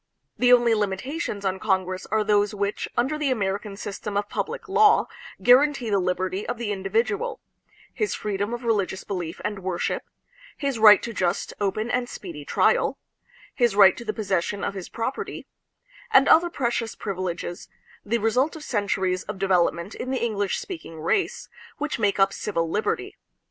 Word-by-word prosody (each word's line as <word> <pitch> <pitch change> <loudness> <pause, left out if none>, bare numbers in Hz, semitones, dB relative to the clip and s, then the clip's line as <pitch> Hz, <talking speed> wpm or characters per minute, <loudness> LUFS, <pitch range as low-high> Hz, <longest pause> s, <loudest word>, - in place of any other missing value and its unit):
The 250 0 +3
only 240 -2 +6
limitations 210 - -2
on 190 0 -1
Con 190 -2 +2
gress 185 0 -6
are 215 +1 +1
those 210 0 +2
which, 200 0 -2
under 270 +6 +1
the 295 -2 +1
American 200 -3 -2
system 205 0 -5
of 205 0 -1
public 440 - -4
law, 420 +2 +5 0.4
guarantee 255 -2 +4
the 200 - +3
liberty 185 +2 -1
of - - -2
the 230 -3 -3
individual, 230 - -1 0.5
his 425 - -1
freedom 205 +1 -2
of 240 +1 -4
religious 200 -5 0
belief 180 -5 -5
and 210 -1 -2
worship; 185 -2 -2 0.6
his 275 -5 -2
right 215 -1 +8
to 235 - -4
just, 180 -4 -1
open, 215 +4 -1
and 250 -1 0
speedy 165 -6 -8
trial; - - +2 0.6
his 240 -5 +2
right 195 -2 +7
to - - -8
the 215 - -2
possession 200 -2 -2
of - - -1
his 190 -3 -7
prop 230 +4 -3
erty; - - -6 0.6
and 290 -11 +6
other 345 +2 +6
precious 235 -6 -2
privileges, 185 -3 -4 0.3
the 230 +3 0
result 245 +8 +1
of 315 - -9
centuries 190 -5 0
of 210 -1 -6
development 185 -1 +1
in 255 - -5
the 255 -3 0
English 205 -4 -1
speaking 320 - -7
race, 375 - -1 0.3
which 300 -4 -3
make 205 -2 +1
up 195 0 +4
civil 170 -5 -2
liberty. 205 +6 -2
210 Hz, 170 wpm, -25 LUFS, 190-245 Hz, 0.6 s, right